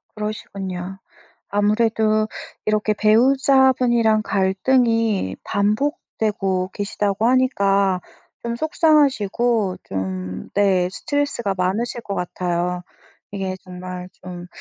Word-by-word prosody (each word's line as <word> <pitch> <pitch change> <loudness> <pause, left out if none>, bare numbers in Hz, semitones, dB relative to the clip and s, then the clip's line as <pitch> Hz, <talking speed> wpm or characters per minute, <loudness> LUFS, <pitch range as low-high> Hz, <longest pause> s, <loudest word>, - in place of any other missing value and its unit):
그러시군요. 195 -3 -5 0.5
아무래도 215 +1 +2 0.4
이렇게 215 0 +1
배우자분이랑 240 0 +4
갈등이 220 - +1
반복되고 205 -4 -1
계시다고 205 +1 -1
하니까 200 -7 +2 0.4
좀 235 0 -2
속상하시고 240 - +2
좀 95 -1 -3 0.3
네 190 -3 +3
스트레스가 280 -9 -1
많으실 215 +6 -1
것 200 - -5
같아요. 180 0 -2 0.5
이게 190 -2 -3
정말 180 0 -7
좀 180 -1 -8
205 Hz, 235 characters per minute, -21 LUFS, 185-235 Hz, 0.5 s, 배우자분이랑